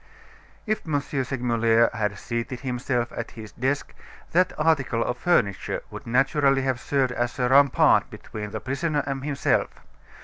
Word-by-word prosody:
If 215 -1 -1
M. 145 -2 +1
Segmuller 120 -4 +1
had 105 -2 -2
seated 115 +3 -4
himself 125 -2 -2
at 115 - -4
his 110 -1 -8
desk, 135 +3 -2 0.4
that 185 +2 +3
article 140 -7 +1
of 125 - -2
furniture 100 - +1
would - - -9
naturally 135 +2 +2
have 130 -2 0
served 135 -1 0
as 120 0 -2
a 125 -1 +1
rampart 140 +1 +5
between 105 -1 -7
the 110 +1 -5
prisoner 145 +3 -1
and 135 -1 -3
himself. 145 -1 +1
130 Hz, 145 wpm, -25 LUFS, 115-140 Hz, 0.4 s, rampart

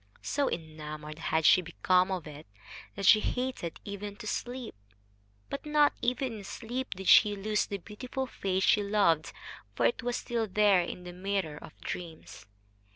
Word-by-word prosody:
So 285 -1 0
enamored 155 -1 -6
had 160 -1 0
she 185 - +7
become 180 +2 +2
of 185 -3 -3
it, 150 -3 -10 0.5
that 200 - -3
she 215 - +8
hated 250 -8 -3
even 200 0 -6
to 215 - -10
sleep; 245 +3 -4 0.7
but 280 - -5
not 300 -1 +3
even 250 -2 -1
in - - -9
sleep 245 +4 -5
did 190 0 -7
she 205 -1 +7
lose 210 +2 0
the 200 - -3
beautiful 245 +7 -5
face 190 -6 -2
she 210 - +4
loved, 200 -7 +2 0.4
for 120 - +1
it 115 - +2
was 245 +1 -1
still 230 -2 -2
there 200 -2 +4
in 175 +1 -6
the 180 0 -8
mirror 185 -4 -2
of - - -13
dreams. 160 - -7
200 Hz, 165 wpm, -30 LUFS, 170-230 Hz, 0.7 s, she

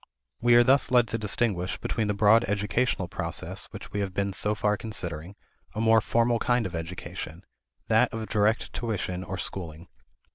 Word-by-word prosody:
We 120 0 +5
are 120 - +7
thus 135 +2 +4
led 120 -2 +4
to 115 - -2
distinguish, 105 -4 0
within 110 -2 -1
the 105 - 0
broad 110 +3 +5
educational 105 0 0
process - - -2
which - - -10
we 105 - -3
have 95 -2 -3
been 100 0 -1
so 105 +2 +1
far 105 0 +1
considering, 90 -5 -5 0.4
a - - -3
more 110 0 +5
formal 115 +1 +1
kind 120 0 +1
of 95 - -5
education 85 +1 -6 0.4
that 115 +3 +3
of 110 -1 -5
direct 105 +1 +1
tuition 95 -6 -3
or 95 +1 -5
schooling. 85 -3 -6
105 Hz, 175 wpm, -27 LUFS, 95-115 Hz, 0.4 s, are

